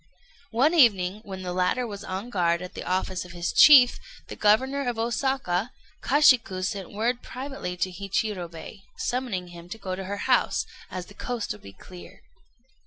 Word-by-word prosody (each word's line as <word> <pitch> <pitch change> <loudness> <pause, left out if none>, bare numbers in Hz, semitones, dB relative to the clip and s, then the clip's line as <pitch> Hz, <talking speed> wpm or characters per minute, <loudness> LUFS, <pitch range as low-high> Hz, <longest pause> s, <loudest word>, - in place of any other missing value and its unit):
One 265 +8 +2
evening, 210 - +4
when 190 -2 -7
the 180 -1 -4
latter 185 +8 +1
was 205 -3 -7
on 195 +6 -5
guard 170 -3 +1
at 180 - -8
the - - -6
office 185 0 -2
of 180 -1 -12
his 175 0 -3
chief, 260 -5 +8 0.3
the - - -6
Governor 260 +6 +2
of 240 - -4
Osaka, 235 -3 -1 0.3
Kashiku 255 -10 +4
sent 195 -2 -4
word 235 +4 -1
privately 255 -9 -6
to 185 +1 -1
Hichirobei, 195 -1 -4 0.2
summoning 230 -8 -3
him 175 0 -12
to 225 - -6
go 190 -3 -4
to 190 0 -6
her 200 +2 -4
house, - - +2 0.2
as 185 -1 -6
the 200 - -15
coast 240 +1 -4
would 105 - -7
be 100 - -12
clear. 180 - -14
200 Hz, 175 wpm, -26 LUFS, 180-245 Hz, 0.3 s, chief